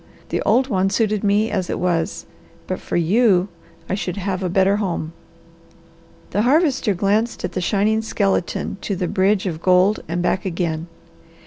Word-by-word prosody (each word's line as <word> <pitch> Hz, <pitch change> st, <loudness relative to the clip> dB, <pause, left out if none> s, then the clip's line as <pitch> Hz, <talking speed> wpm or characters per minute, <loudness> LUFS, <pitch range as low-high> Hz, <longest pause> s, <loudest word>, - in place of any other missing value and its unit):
The -, -, -1 dB
old 245 Hz, +5 st, +3 dB
one 195 Hz, -5 st, +1 dB
suited 210 Hz, 0 st, 0 dB
me 210 Hz, +2 st, +2 dB
as 185 Hz, -3 st, -2 dB
it -, -, -2 dB
was; 170 Hz, -2 st, -1 dB, 0.4 s
but -, -, -3 dB
for -, -, -3 dB
you 190 Hz, +2 st, +3 dB, 0.4 s
I -, -, -2 dB
should 190 Hz, -2 st, -3 dB
have 195 Hz, -1 st, -2 dB
a 185 Hz, -, -1 dB
better 190 Hz, +2 st, +3 dB
home." 170 Hz, -5 st, -3 dB, 1.2 s
The 205 Hz, -, +1 dB
Harvester 265 Hz, -, +2 dB
glanced 210 Hz, +5 st, 0 dB
from 180 Hz, -, -3 dB
the 185 Hz, -, -3 dB
shining 210 Hz, +4 st, +1 dB
skeleton 200 Hz, -3 st, -1 dB
to 200 Hz, -, -2 dB
the 180 Hz, -1 st, -2 dB
bridge 195 Hz, +1 st, +1 dB
of 165 Hz, -4 st, -3 dB
gold 185 Hz, +3 st, +4 dB
and 175 Hz, +2 st, -2 dB
back 185 Hz, -, 0 dB
again. 170 Hz, -3 st, -2 dB
195 Hz, 170 wpm, -21 LUFS, 180-210 Hz, 1.2 s, gold